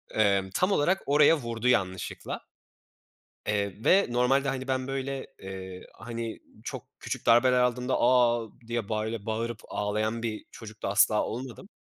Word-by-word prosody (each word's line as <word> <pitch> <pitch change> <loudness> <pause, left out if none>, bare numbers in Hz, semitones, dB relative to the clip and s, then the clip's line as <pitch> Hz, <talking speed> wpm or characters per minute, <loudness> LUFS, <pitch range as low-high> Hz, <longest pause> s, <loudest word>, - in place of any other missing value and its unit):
Eee, 100 -3 +3
tam 185 +2 +2
olarak 185 +3 +2
oraya 150 +3 +5
vurdu 115 -2 -3
yanlışlıkla. 95 -7 0 1.1
Eee, 100 0 -1
ve 195 +2 +5
normalde 135 +3 +2
hani, 130 0 -3
ben 130 0 -1
böyle, 135 0 -3
eee, 95 -1 -8
hani, 115 0 -6 0.2
çok - - -6
küçük - - -5
darbeler 125 +2 +5
aldığımda 125 +1 +1
"A!" 120 -2 +4 0.2
diye 115 -3 -2
böyle 110 -1 -2
bağırıp 115 0 -2
ağlayan 110 +3 -1
bir 110 -2 -3
çocuk 110 -2 -11
da - - 0
asla 105 +1 +4
olmadım. 130 - -6
115 Hz, 140 wpm, -28 LUFS, 110-130 Hz, 1.1 s, oraya